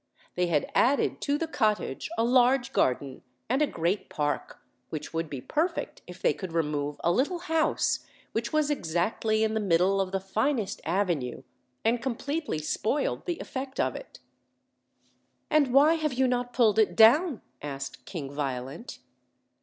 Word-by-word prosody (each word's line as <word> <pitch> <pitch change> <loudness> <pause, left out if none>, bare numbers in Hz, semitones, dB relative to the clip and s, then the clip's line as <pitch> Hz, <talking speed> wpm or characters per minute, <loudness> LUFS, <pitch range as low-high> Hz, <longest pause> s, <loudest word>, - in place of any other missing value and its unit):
They 180 0 +1
had 155 -4 +1
added 270 +3 +2
to 285 +1 +1
the 330 - -1
cottage 215 - -1
a 225 - +2
large 250 +2 +3
garden 130 +1 0 0.3
and 260 +5 +1
a 300 - +4
great 175 +2 -1
park, 145 -1 -2 0.3
which 150 0 -6
would 165 -1 -2
be 135 -4 -5
perfect 320 - -2
if - - -10
they 485 - +4
could 185 -4 -7
remove 150 -3 -1
a 170 - +3
little 280 - +1
house 325 -2 +1 0.3
which 230 +1 -2
was 305 -1 +2
exactly 215 - 0
in 220 0 +1
the 220 - 0
middle 195 0 +3
of 190 -1 -3
the 195 - 0
finest 220 +4 -1
avenue, 165 -8 -1 0.4
and 230 +1 +2
completely 280 - -2
spoiled 215 - -1
the 345 -2 -1
effect 265 0 -6
of - - +1
it. - - -10 1.3
"And 295 -4 +4
why 285 +5 +6
have 310 -4 -1
you 260 +1 +2
not 245 0 -1
pulled 225 -4 +3
it 215 - +3
down?" 265 +7 +5 0.2
asked 140 -1 -6
King 145 -7 -6
Violent. 135 - -4
220 Hz, 160 wpm, -28 LUFS, 165-275 Hz, 1.3 s, why